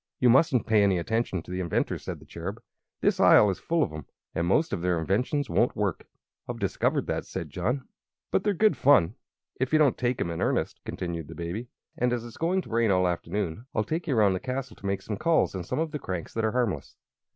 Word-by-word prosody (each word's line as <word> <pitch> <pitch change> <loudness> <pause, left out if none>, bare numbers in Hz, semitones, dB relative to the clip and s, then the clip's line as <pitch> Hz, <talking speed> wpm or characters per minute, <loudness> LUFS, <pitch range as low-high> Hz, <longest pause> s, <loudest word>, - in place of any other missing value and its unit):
"You 125 -2 +5
mustn't 130 -1 +4
pay 110 -2 +4
any 100 -2 +3
attention 95 -1 -1
to - - -11
the 90 - -3
inventors," 85 -2 -1
said - - -5
the - - -16
Cherub. - - -6 0.4
"This - - +2
Isle 105 - +7
is 95 - -5
full 165 -1 +1
of - - -3
'em, 75 -3 -8 0.3
and 85 +1 -1
most 150 - +2
of - - -2
their 90 -1 +1
inventions 125 - 0
won't 120 - +2
work." 100 -5 -2 0.4
"I've - - -3
discovered - - 0
that," - - -2
said 80 -4 -6
John. 125 - -2 0.4
"But 190 - +2
they're 205 -2 +1
good 215 +4 +4
fun, 105 - +4 0.5
if 130 0 0
you 155 - +5
don't 150 -5 +3
take 125 0 0
'em 85 - -1
in 85 - -4
earnest," - - 0
continued 85 -3 -4
the 80 - -9
Baby; 90 +8 -4 0.3
"and 125 0 +2
as 120 -1 -2
it's 115 - -10
going 180 +3 +1
to - - -13
rain 115 -1 +2
all 90 -1 +3
the 90 - +3
afternoon 100 +4 -4
I'll 110 - +2
take 160 +10 -3
you 135 -6 +1
around 100 -3 +5
the 95 - -2
castle 130 +2 -4
to - - -12
make 100 0 -1
some 105 - -4
calls 165 +7 +2
on 95 -2 -4
some - - -3
of 160 0 -1
the 150 - -4
cranks 90 -8 -5
that 115 -1 0
are 110 - 0
harmless." 105 - -1
110 Hz, 240 wpm, -27 LUFS, 90-130 Hz, 0.5 s, Isle